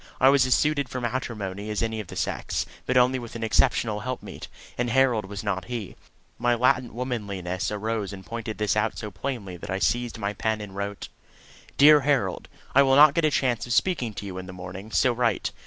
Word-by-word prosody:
I 130 - +6
was 135 -2 +4
as 125 - +4
suited 145 -3 +1
for 130 - -4
matrimony 110 -5 -4
as 105 +1 -1
any 110 -1 -2
of 105 - -6
the - - -9
sex, - - -2 0.2
but 130 - +2
only 125 +1 +4
with 120 -1 -9
an 115 - -4
exceptional 110 -1 +2
helpmeet 125 +3 -6 0.3
and 120 0 -1
Harold 120 -4 +3
was 100 0 -7
not 100 -3 -2
he. 120 -6 -5 0.4
My 120 0 +2
latent 125 -1 +1
womanliness 100 -8 -3
arose 105 -1 -2
and 95 -2 -9
pointed 115 -1 -5
this 105 -1 +1
out 105 +1 0
so 105 - -6
plainly 100 -3 -5
that 85 - -9
I 95 - -1
seized 115 +7 0
my 100 -2 -2
pen 110 +1 -1
and 100 -2 -8
wrote: 100 0 -5 0.7
DEAR 150 +1 +8
HAROLD, 135 -10 0 0.2
I 140 - +7
will 135 -1 +4
not 145 0 +8
get 165 0 +2
a - - +4
chance 125 -5 0
of 120 - -1
speaking 125 - +1
to - - -6
you 95 -2 -6
in 90 - -8
the 95 - -8
morning, 95 +4 -8
so 125 +1 +3
write. 120 -3 0
115 Hz, 215 wpm, -25 LUFS, 100-125 Hz, 0.7 s, DEAR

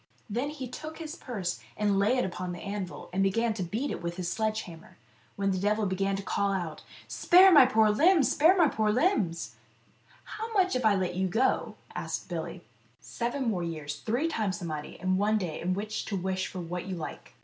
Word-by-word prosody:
Then 245 +6 -2
he 285 -4 -6
took 310 +6 -8
his 320 0 -6
purse 195 - -4 0.2
and 205 -2 +2
lay 215 +6 +3
it 250 - +1
upon 180 -1 -4
the 175 - -7
anvil, 200 -2 -5
and 190 - +1
began 225 +4 +2
to 210 - -5
beat 215 +11 -2
it - - -4
with 170 0 -3
his 180 -1 -2
sledge 220 -1 -1
hammer, 165 -4 -13 0.4
when 195 0 0
the 185 - -1
devil 210 +2 +1
began 195 +1 0
to 195 - -4
call 200 0 0
out, 175 -5 -3 0.2
" - - -21
Spare 375 +1 +6
my 285 -7 +8
poor 220 -4 +4
limbs, 320 - +4
spare 335 +6 +5
my 340 -4 +6
poor 215 -5 0
limbs! 210 - 0 0.2
" - - -35
" - - -29 0.2
How 450 +1 -4
much 375 -3 +3
now 255 - +1
if 245 - -3
I 205 - +4
let 185 -2 -1
you 185 +1 0
go 225 +8 +1
?" - - -19
asked - - -4
Billy. - - -5 0.3
" - - -38
Seven 245 +2 -3
more 195 -6 0
years, 155 -4 -4
three 245 +8 0
times 215 - -1
the 185 - -6
money, 155 -2 -5
and 185 +1 +1
one 215 +2 +3
day 175 -6 -4
in 185 +2 0
which 210 +2 -3
to 205 - -3
wish 190 +1 -2
for 185 - -7
what 175 +2 -5
you 190 - -3
like." 155 -6 -8
205 Hz, 235 wpm, -29 LUFS, 185-250 Hz, 0.4 s, my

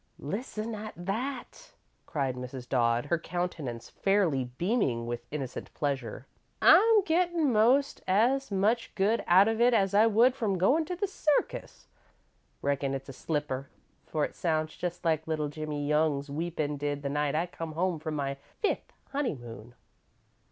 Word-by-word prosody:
"Listen 215 - -4
at 215 0 -6
that!" 245 - -5 0.3
cried 135 -4 -1
Mrs. 125 0 -7
Dodd, 120 0 +2
her 165 +3 0
countenance 160 -10 -4
fairly 185 -10 +1
beaming 125 - 0
with 120 0 -5
innocent 135 -4 -5
pleasure. 135 -4 -3 0.3
"I'm 440 0 +7
gettin' 335 -4 +2
most 250 +6 +3
as 245 +8 +2
much 210 +5 +1
good 210 +3 +2
out 190 +4 +7
of 225 +1 0
it 240 0 +5
as 195 -2 +2
I 215 +2 +6
would 230 +4 +5
from 215 -7 -1
goin' 270 - +3
to 360 - -4
the 405 - -1
circus. 310 -6 -1 0.8
Reckon 140 -1 0
it's 135 +1 -7
a - - -7
slipper, 140 -2 -3 0.4
for 155 -2 0
it - - -8
sounds 155 -2 -1
just 175 0 -5
like 160 -1 +1
little 155 -2 -1
Jimmie 150 -1 -4
Young's 150 -2 +1
weepin' 155 -1 -2
did 145 0 -3
the - - -1
night 145 0 0
I 165 +3 +1
come 165 -2 -7
home 175 0 0
from 155 0 -4
my 140 -1 -2 0.2
fifth 425 - -1 0.2
honeymoon. 120 - -4
165 Hz, 155 wpm, -29 LUFS, 140-220 Hz, 0.8 s, I'm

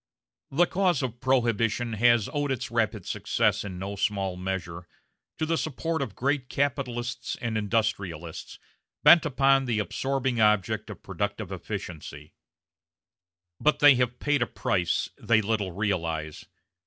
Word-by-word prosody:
The 165 +6 +3
cause 180 -6 +1
of 120 -2 -4
Prohibition 120 -3 +1
has 120 0 +4
owed 145 -1 -1
its 130 -3 -3
rapid 110 -4 0
success - - 0
in 95 -3 -6
no 100 +2 -5
small 100 -2 -1
measure 90 -2 -5 0.5
to 155 - -1
the 165 +1 0
support 160 +2 -2
of 115 -9 -4
great 135 +1 -1
capitalists 125 -4 -2
and 115 -2 -3
industrialists 100 -6 -2 0.5
bent 170 - +8
upon 135 0 +3
the 120 -3 0
absorbing 130 +4 -1
object 105 -3 +2
of - - -9
productive - - -4
efficiency; 75 -3 -7 1.3
but 150 - +3
they 145 -1 +8
have 125 -1 0
paid 145 -1 0
a 120 - +2
price 90 -9 -1
they 115 -2 +3
little 105 -3 -1
realize. 85 -5 -2
115 Hz, 135 wpm, -27 LUFS, 95-135 Hz, 1.3 s, bent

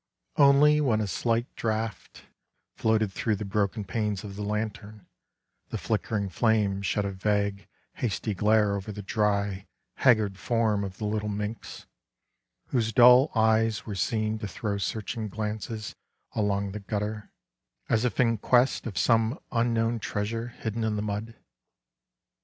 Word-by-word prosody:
Only 150 +1 +6
when 120 -7 +2
a 110 - 0
slight 115 +5 0
draught 110 -1 -3 0.5
floated 110 -2 +1
through 110 +2 0
the 105 - -5
broken 100 +1 -1
panes 105 0 -2
of 100 -2 -8
the 105 - -6
lantern 105 -1 -4 0.3
„ - - -50
the - - -3
flickerng 100 -3 -2
flame 105 -4 +1
shed 100 +1 0
a 100 - -2
vague, 100 +1 -1 0.3
hasty 110 -2 -2
glare 105 +1 +3
over 100 +2 -5
the 105 0 -7
dry,, 100 -2 0 0.3
haggard 110 -6 +3
form 110 -4 +1
of 95 -1 -6
the 110 - -4
little 105 0 -1
minx, 105 +2 -5 0.8
whose 115 -4 0
dull 125 +4 +7
eyes 110 0 +2
were 105 - -5
seen 110 +2 -1
to 105 - -4
throw 100 +1 -3
searching 110 +2 -3
glances 105 +1 -4 0.4
along 100 -2 0
the 105 - -5
gutter, 105 +1 -4 0.6
as 110 +1 +2
if 125 -4 -1
in 115 -3 +3
quest 125 +3 +2
of 100 - -6
some 115 +3 +2
unknown 115 0 +1
treasure 110 +3 -3
hidden 115 -2 -4
in 110 -1 0
the 105 - -2
mud. 105 +2 -4
110 Hz, 145 wpm, -27 LUFS, 100-115 Hz, 0.8 s, dull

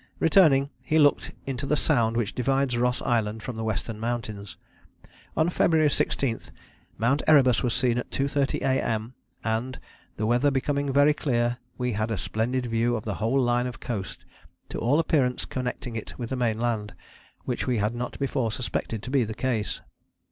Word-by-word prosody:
Returning, 155 -6 +4
he 155 - +1
looked 145 -2 +3
into 135 +1 -3
the 150 - +2
Sound 115 -8 +2
which 115 -3 -1
divides 135 0 +1
Ross 125 +1 0
Island 110 -2 0
from 125 - -5
the 110 - -4
western 110 0 -3
mountains. 110 -4 -4 0.8
On 160 - +3
February 160 -3 +3
16 120 -5 0 0.6
"Mount 130 +6 +2
Erebus 130 -6 +5
was 120 -2 0
seen 125 -2 +1
at - - -6
2.30 140 0 0
A.M., 115 -3 0 0.3
and, 115 +4 -2 0.4
the 110 - -1
weather 120 +5 +3
becoming 140 +1 0
very 145 +2 +5
clear, 120 -4 0 0.2
we 125 -1 -1
had 110 +1 -1
a 110 - -1
splendid 125 +6 -1
view 115 +1 +1
of 110 - -5
the 105 - -2
whole 115 +5 +2
line 120 -1 +2
of 125 - -7
coast, 105 -5 -5 0.4
to - - -4
all 130 +6 +2
appearance 140 -6 +1
connecting 125 -2 -4
it 110 - -6
with 120 -1 -5
the - - 0
main 120 -3 0
land, 110 -3 -2 0.5
which - - -2
we 125 -2 +1
had 105 +2 0
not 120 +1 -4
before 130 -4 -1
suspected 115 -2 -3
to 125 - -6
be 135 -3 +3
the 110 -1 -5
case." 115 -5 -2
125 Hz, 175 wpm, -26 LUFS, 115-135 Hz, 0.8 s, Erebus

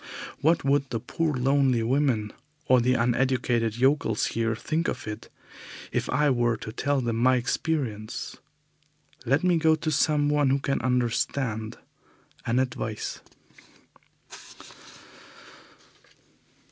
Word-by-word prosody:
What 165 +3 +2
would 140 0 +2
the 115 - -2
poor 160 +6 -2
lonely 130 -2 +2
women, 120 -4 +1 0.3
or 130 -1 +4
the 125 +2 +2
uneducated 120 -2 +1
yokels 130 -4 +2
here 115 0 0
think 160 +8 -2
of - - -3
it 105 -1 -7 0.6
if - - -2
I 150 -1 +2
were 120 -2 +1
to 110 - -7
tell 140 +3 0
them 115 -2 -1
my 130 +2 +4
experience? 120 -4 -2 0.9
Let 135 +7 +2
me 180 -2 +3
go 160 0 +4
to 155 0 -3
someone 145 -1 +2
who 135 - +3
can 140 0 -1
understand 120 -2 -1 0.7
and 120 +2 +2
advise. 115 -4 -3
130 Hz, 115 wpm, -26 LUFS, 115-145 Hz, 0.9 s, or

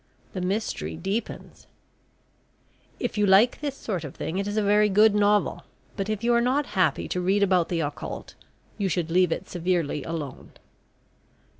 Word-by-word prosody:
The 185 - -4
Mystery 180 - -2
deepens. 200 - -5 1.3
If 240 -4 -2
you 205 - +3
like 205 +8 +5
this 285 -2 -3
sort 185 -7 -4
of 145 - -8
thing 180 +4 -3
it 200 - -2
is 205 +1 -3
a 215 - +2
very 210 +1 +4
good 210 +2 +5
novel, 205 0 +2 0.3
but 195 0 -3
if 215 0 -2
you 240 +1 +3
are 235 - +4
not 265 +4 +1
happy 185 -5 +1
to 180 - -1
read 195 +3 +2
about 185 -3 +2
the 170 -2 0
occult, 145 -1 -5 0.5
you 195 -2 0
should 170 -1 -1
leave 180 0 +3
it - - -3
severely 170 -5 -1
alone. 155 -5 -6
195 Hz, 170 wpm, -25 LUFS, 175-210 Hz, 1.3 s, like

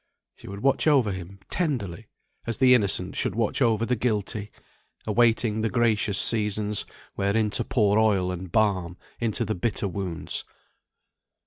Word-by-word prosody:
She - - -15
would 100 +1 -8
watch 135 +3 +2
over 135 -9 +3
him 95 +1 -8
tenderly, 115 - -3 0.4
as 115 - -2
the 130 -1 +5
Innocent 100 -5 +1
should - - -1
watch 115 +4 -1
over 115 -2 +2
the 125 - 0
Guilty; 105 -2 -2 0.6
awaiting 110 0 +2
the 110 - 0
gracious 110 -4 +1
seasons, 105 -2 +3 0.3
wherein 105 +2 0
to - - +2
pour 105 -3 +2
oil 100 -5 +2
and 90 0 -7
balm 95 -5 0 0.2
into 115 0 -1
the 110 - -2
bitter 105 +2 -1
wounds. 95 -3 -4
105 Hz, 145 wpm, -25 LUFS, 100-115 Hz, 0.6 s, the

